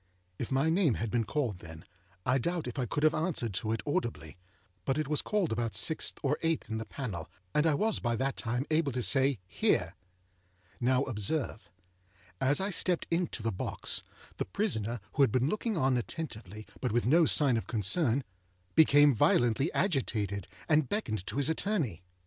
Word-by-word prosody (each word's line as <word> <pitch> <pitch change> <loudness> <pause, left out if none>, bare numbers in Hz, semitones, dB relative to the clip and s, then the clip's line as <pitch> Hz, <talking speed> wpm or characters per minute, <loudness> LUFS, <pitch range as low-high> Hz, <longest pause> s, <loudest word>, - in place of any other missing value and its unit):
If 120 - -4
my 135 +4 +2
name 165 - +3
had 115 -1 -3
been 115 -2 +1
called 120 - -2
then, 80 +1 -11 0.4
I 130 +2 +3
doubt 170 +5 -1
if 125 +2 -5
I 125 - -1
could 145 +7 -2
have 155 0 +5
answered 155 - -1
to 110 +4 -2
it 115 -2 -2
audibly. 80 - -2 0.5
But 135 +1 0
it 155 -2 -1
was 150 0 +1
called 205 -6 0
about 115 0 -1
sixth 160 - 0
or 140 +1 +1
eighth 165 -8 -1
in 110 - -1
the 110 - -5
panel, 105 - -5 0.2
and 150 +2 +3
I 155 - +3
was 220 +7 +1
by 120 -1 0
that 135 +3 -1
time 125 +3 -2
able 155 -2 +2
to 125 0 0
say, 135 0 +3
âHere!â - - +1 0.9
Now, 130 +2 +2
observe. 115 - -2 0.7
As 135 +4 +3
I 195 +2 -1
stepped 180 -2 +2
into 165 -9 -1
the 115 - 0
box, 90 - -3 0.4
the - - -1
prisoner, 115 - -1
who 145 - +1
had 135 - +5
been 130 +3 +2
looking 215 +1 -1
on 135 -4 +2
attentively, 110 - -5
but 125 - -1
with 120 +2 +1
no 160 +6 +5
sign 140 -5 +4
of 115 - -2
concern, 120 - +1 0.5
became 145 -2 +6
violently 120 +5 +3
agitated, 105 - 0 0.2
and 155 -4 +3
beckoned 110 - -2
to 110 - -4
his 140 -1 +3
attorney. 160 - -1
130 Hz, 185 wpm, -31 LUFS, 115-155 Hz, 0.9 s, became